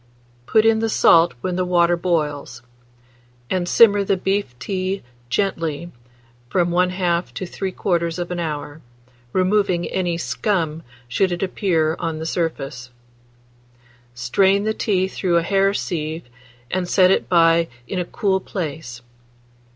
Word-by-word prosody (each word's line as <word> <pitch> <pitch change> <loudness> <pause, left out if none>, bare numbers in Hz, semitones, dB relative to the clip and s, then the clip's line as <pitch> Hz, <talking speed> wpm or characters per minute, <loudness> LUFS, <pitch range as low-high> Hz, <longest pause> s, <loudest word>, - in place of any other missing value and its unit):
Put 220 0 +4
in 225 0 +4
the 225 0 0
salt 170 -5 +5
when 180 -1 -2
the 185 - +1
water 175 -1 +3
boils, 150 -8 -2 0.9
and 180 -1 0
simmer 205 -3 +6
the 195 0 +1
beef 190 -9 -2
tea 190 - -3 0.3
gently 165 -1 -2 0.6
from 175 +2 +1
1/2 180 -1 0
to 185 - -4
3/4 175 -2 -2
hour, 150 -2 -5 0.5
removing 185 0 +1
any 180 -2 -1
more - - -2
scum 165 -3 -1 0.3
should 185 +10 +1
it 175 +1 -2
appear 165 -5 0
on 165 -2 -3
the 160 - -5
surface. 150 -7 -3 1.3
Strain 190 +11 +2
the 220 +1 0
tea 190 -4 0
through 180 -2 0
a 170 - +2
hair 195 +2 +2
sieve, 160 -4 -3 0.5
and 180 -1 -1
set 185 0 +5
it - - +1
by 165 -1 +4 0.2
in 185 - -3
a 180 - -1
cool 195 0 0
place. 150 - -6
175 Hz, 135 wpm, -21 LUFS, 165-190 Hz, 1.3 s, simmer